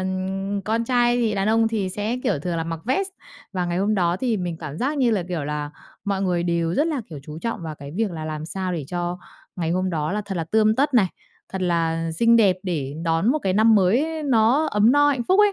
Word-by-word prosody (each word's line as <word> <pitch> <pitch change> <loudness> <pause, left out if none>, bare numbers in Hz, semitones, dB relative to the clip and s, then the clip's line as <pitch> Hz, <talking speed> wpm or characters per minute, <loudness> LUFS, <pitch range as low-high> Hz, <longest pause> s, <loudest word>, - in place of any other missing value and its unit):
ừm, 190 +2 -2
con 225 +2 0
trai 240 0 +2
thì 225 -3 +1
đàn 195 +2 0
ông 225 0 +3
thì 210 -4 -1
sẽ 210 +5 -2
kiểu - - +1
thường 170 +3 -3
là 165 - -1
mặc 165 -1 -4
vest 380 - 0 0.4
và 180 -2 -1
ngày 175 +1 -1
hôm 210 +2 +1
đó 175 -2 +1
thì 240 0 0
mình 175 -3 -3
cảm 155 -1 -7
giác 280 +4 -1
như 245 -3 +3
là, 205 -4 +1
kiểu 165 -5 -2
là, 150 0 -3 0.3
mọi 195 -1 -1
người 180 -2 +1
đều 170 0 0
rất 300 - +2
là, 305 -5 -1
kiểu, 150 - -7
chú 150 +2 -8
trọng 230 -3 -4
vào 155 -2 -5
cái 140 -1 -10
việc 220 -3 0
là 160 -2 -6
làm 155 0 -4
sao 185 0 -3
để 160 -5 -3
cho 175 0 -3 0.4
ngày 165 -2 -1
hôm 185 +1 0
đó 155 +1 -1
là 210 - -1
thật 195 -1 -5
là 165 - -1
tươm 215 +4 +3
tất 280 0 +1
này, 210 -6 +5 0.5
thật 190 -1 -3
là 165 -2 0
xinh 230 +7 +4
đẹp 195 -5 +4
để 150 -7 -3
đón 165 +8 +2
một 310 - 0
cái 190 - +1
năm 220 +2 +5
mới 265 - +2
nó 255 +4 +3
ấm 210 +4 +4
no 290 0 +5
hạnh 270 -4 +1
phúc 380 +3 +5
ấy. 415 -1 +5
190 Hz, 255 wpm, -23 LUFS, 170-230 Hz, 0.5 s, này